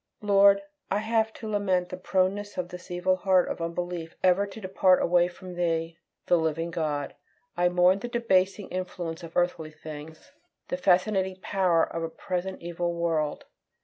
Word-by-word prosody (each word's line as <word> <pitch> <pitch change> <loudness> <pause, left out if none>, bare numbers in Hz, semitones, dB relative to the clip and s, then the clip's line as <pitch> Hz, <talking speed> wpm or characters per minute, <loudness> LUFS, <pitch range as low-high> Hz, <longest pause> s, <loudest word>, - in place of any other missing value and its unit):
Lord, 200 -1 +5 0.3
I 200 - +1
have 220 +1 +1
to 220 - -8
lament 190 -4 0
the - - -5
proneness 190 +2 -1
of 180 -1 -2
this 180 -1 -10
evil 180 +1 +1
heart 185 -1 +3
of - - -4
unbelief 170 0 -4
ever 185 +2 +4
to 200 +2 -10
depart 185 -2 +3
away 175 0 +3
from 180 +1 -10
Thee, 165 -1 -1 0.3
the 175 - +4
living 165 +1 -1
God. 150 -4 -2 0.4
I 175 0 +3
mourn 180 +2 +4
the 240 - -5
debasing 205 -4 +1
influence 180 -2 -4
of 165 -1 -7
earthly 175 -3 0
things; 155 0 -10 0.4
the 270 - -1
fascinating 190 -3 +2
power 180 -4 +2
of 165 - -3
a 165 - -2
present 185 +2 -4
evil 175 0 -2
world. 165 -3 -1
180 Hz, 165 wpm, -27 LUFS, 170-190 Hz, 0.4 s, Lord